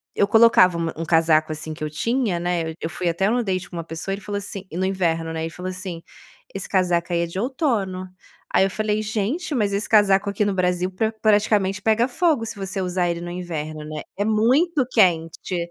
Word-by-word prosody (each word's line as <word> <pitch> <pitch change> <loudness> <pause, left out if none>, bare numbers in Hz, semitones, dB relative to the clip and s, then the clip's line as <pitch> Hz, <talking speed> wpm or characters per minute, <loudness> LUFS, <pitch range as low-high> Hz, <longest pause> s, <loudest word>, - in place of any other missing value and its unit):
eu 200 - +3
colocava 205 -5 +6
uma 165 -1 -2
um 165 - -3
casaco, 160 -1 +3
assim, 155 +1 -5
que 155 - -8
eu 155 - -2
tinha, 225 - 0
né, 175 -2 -1
eu - - -5
eu 160 - -2
fui 175 0 -2
até 170 +3 0
em - - +3
um 245 +1 +1
date 190 -3 -2
com - - -10
uma 165 - -3
pessoa, 165 +4 -5
ele 200 - -5
falou 205 +1 -4
assim, 200 -1 -6
e 165 - -7
no 185 - 0
inverno, 165 -4 0
né, 160 - -3
ele 165 - -2
falou 180 +2 -6
assim: 185 -2 -6 0.5
"Esse 195 - -5
casaco 180 -2 +1
aí 170 - +2
é - - +1
de 170 +3 -5
outono." 215 - -1 0.5
Aí - - +5
eu - - 0
falei: 215 +1 -1
"Gente, 220 - -2
mas 205 -5 +1
esse 200 +1 -1
casaco 205 -2 +4
aqui 200 +1 0
no 200 - 0
Brasil 180 0 +1
pra 220 +4 -1
praticamente 210 -2 +2
pega 220 +3 +3
fogo 310 -3 +1
se 225 0 -6
você 195 0 -4
usar 180 -1 0
ele 170 0 -2
no 175 - -6
inverno, 155 -4 -5
né. 155 0 -6 0.2
É 205 - +1
muito 255 +8 +2
quente." 175 -4 +2
190 Hz, 230 wpm, -22 LUFS, 170-215 Hz, 0.5 s, colocava